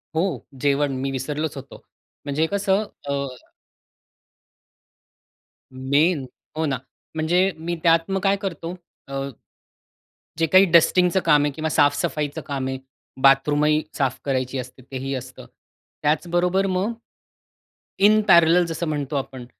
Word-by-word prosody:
हो, 165 -5 -1 0.2
जेवण 140 0 +2
मी 135 0 -2
विसरलोच 145 +3 -3
होतो. 135 +1 -10 0.5
म्हणजे 145 +3 0
कसं 200 +1 +1 0.3
अ - - 0 2.6
मेन 140 +3 +1 0.3
हो 160 - 0
ना, 135 -3 -1 0.4
म्हणजे 175 +5 +2
मी 170 +2 -3
त्यात 165 +2 +3
मग 195 - +1
काय 195 0 +3
करतो? 175 -2 -5 0.3
अ, 135 - -9 1.3
जे 165 - +2
काही 185 +5 +6
डस्टिंगचं 180 +2 +4
काम 145 -3 +4
आहे 145 - 0
किंवा 155 +2 -3
साफ-सफाईचं 150 0 +1
काम 135 -2 -3
आहे, 130 0 -3 0.4
बाथरूम 140 +2 +4
ही 155 0 +3
साफ 135 -2 0
करायची 130 -1 -1
असते, 125 +1 -8
तेही 135 +1 -4
असतं. 130 0 -8 0.6
त्याचबरोबर 175 +5 +1
मग, 190 +4 -1 1.1
इन 215 +2 +5
पॅरलल 170 0 +6
जसं 165 0 -4
म्हणतो 145 -1 -3
आपण, 130 -2 -4
155 Hz, 125 wpm, -23 LUFS, 135-175 Hz, 2.6 s, काही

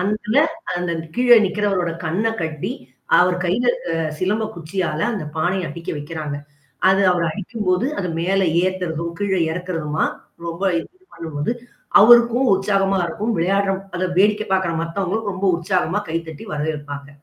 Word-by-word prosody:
அந்ததுல 215 +5 0 0.4
அந்த 175 -1 -2 0.2
கீழே 245 -1 +6
நிக்கிறவரோட 195 -3 0
கண்ண 180 +7 0
கட்டி, 160 -2 -3 0.5
அவர் 180 0 +4
கையில 190 +8 +1 0.3
அ - - 0 0.2
சிலம்ப 210 +5 0
குச்சியால 165 -1 -3
அந்த 200 -8 -3
பானைய 175 +2 0
அட்டிக்க 165 +3 -6
வைக்கிறாங்க. 150 -1 -5 0.5
அது 195 +1 +3
அவர் 175 -2 0
அடிக்கும்போது, 200 +2 -1
அது 180 - -2
மேல 195 +3 +1 0.2
ஏத்துறதும் 170 -3 -2
கீழே 190 -3 +1
இறக்கறதுமா? 165 -3 -2 0.4
ரொம்ப 170 +2 -5 0.2
இ - - 0 0.3
பண்ணும்போது, 160 +4 -3 0.5
அவருக்கும் 240 +3 +6
உற்சாகமா 195 0 +1
இருக்கும். 215 +7 -2
விளையாடுற 195 +3 +2 0.2
அத 185 - 0
வேடிக்கை 210 +2 +3
பார்கற 190 -3 +1
மத்தவங்களும் 195 +5 -2
ரொம்ப 190 +1 -4
உற்சாகமா 180 +2 0
கைதட்டி 160 -2 -4
வரவேற்பாங்க. 145 -2 -4
185 Hz, 130 wpm, -21 LUFS, 165-200 Hz, 0.5 s, கீழே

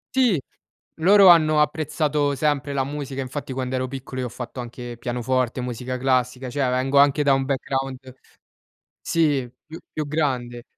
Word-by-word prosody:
Sì, 245 - +3 0.6
loro 195 +3 +7
hanno 155 -3 +6
apprezzato 150 -2 0
sempre 145 0 0
la 135 -1 0
musica. 140 -1 -5
Infatti, 135 +1 -5
quando 130 0 -3
ero 130 0 -1
piccolo, 130 0 -6
io 125 - -2
ho - - -8
fatto 125 +2 -8
anche 120 0 -8
pianoforte, 125 +1 -1
musica 125 +1 -4
classica. 125 0 0
Cioè, 140 +1 0
vengo 130 +2 0
anche 145 +1 +4
da 140 -1 +4
un 135 0 +1
background 135 -1 -2 1.0
sì, 145 -7 +1 0.2
più 160 +1 -10
più 155 -1 -4
grande. 125 -6 -2
135 Hz, 155 wpm, -23 LUFS, 125-150 Hz, 1.0 s, loro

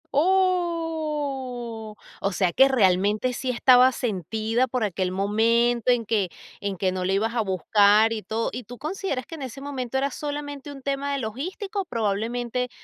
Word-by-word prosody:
Oh. 300 - -1 0.2
O 195 - -1
sea, 185 -1 +1
que 265 +9 +6
realmente 210 -1 +2
sí 255 +1 -3
estaba 250 +1 +6
sentida 220 - -1
por 250 -3 -1
aquel 185 -2 -1
momento 230 +5 +2
en 240 -2 +1
que 205 -4 0 0.3
en 200 -1 -3
que 185 +1 +1
no 185 0 -2
la 190 - +1
ibas 215 +3 0
a 240 - +1
buscar 205 +3 +4
y 225 -1 -2
todo. 225 +2 -2
¿Y 250 - -6
tú 245 +3 -10
consideras 305 -3 -3
que 330 - -8
en 310 - -10
ese 260 +1 -7
momento 265 -3 -3
era 275 +1 0
solamente 290 0 -5
un 275 -1 -10
tema 280 +1 -2
de 280 - -1
logístico? 370 - -4
Probablemente 235 - -2
245 Hz, 170 wpm, -25 LUFS, 215-280 Hz, 0.3 s, que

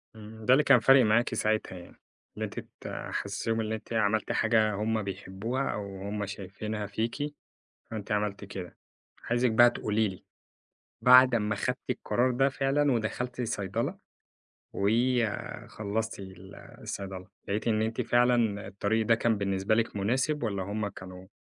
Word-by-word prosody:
إمم، 110 0 -11
ده 125 - +6
اللي 145 +3 +5
كان 135 -4 +6
فارق 135 +1 +6
معاكِ 110 +1 +2
ساعتها 110 -3 0
يعني، 85 - -13 0.4
إن - - -7
أنتِ - - -4 0.2
تحسسيهم 115 0 -3
إن 110 - -3
أنتِ 110 +1 -5
عملتِ 110 0 +1
حاجة 110 -2 +2
هُم 110 +1 -1
بيحبوها 100 +7 -3
أو 100 -2 -6
هُم 105 0 -2
شايفينها 100 +2 -5
فيكِ، 115 +8 -3 0.6
فأنتِ 105 -2 -5
عملتِ 105 -1 -1
كده. 95 -3 -8 0.5
عايزِك 120 0 +2
بقى 120 +2 +7
تقولي 110 -1 0
لي، 95 -2 -8 0.8
بعد 125 0 +8
أمّا 105 -2 +1
خدتِ 125 +4 -1
القرار 125 +1 +1
ده 135 +2 +3
فعلًا 140 +1 +1
ودخلتِ 120 +2 -2
صيدلة، 100 -4 -2 0.8
وخلصتِ 110 -1 -1 0.6
الصيدلة، 95 -2 -6 0.2
لقيتِ 105 +3 -2
إن 110 -1 +2
أنتِ 110 0 -1
فعلًا 120 -4 +2
الطريق 105 +3 0
ده 115 - +5
كان 115 -1 +1
بالنسبة 100 +1 0
لِك 115 -1 0
مناسب 130 +8 0
والّا 100 -4 -1
هُم 105 +2 -2
كانوا 95 -1 -10
110 Hz, 145 wpm, -29 LUFS, 100-120 Hz, 0.8 s, بعد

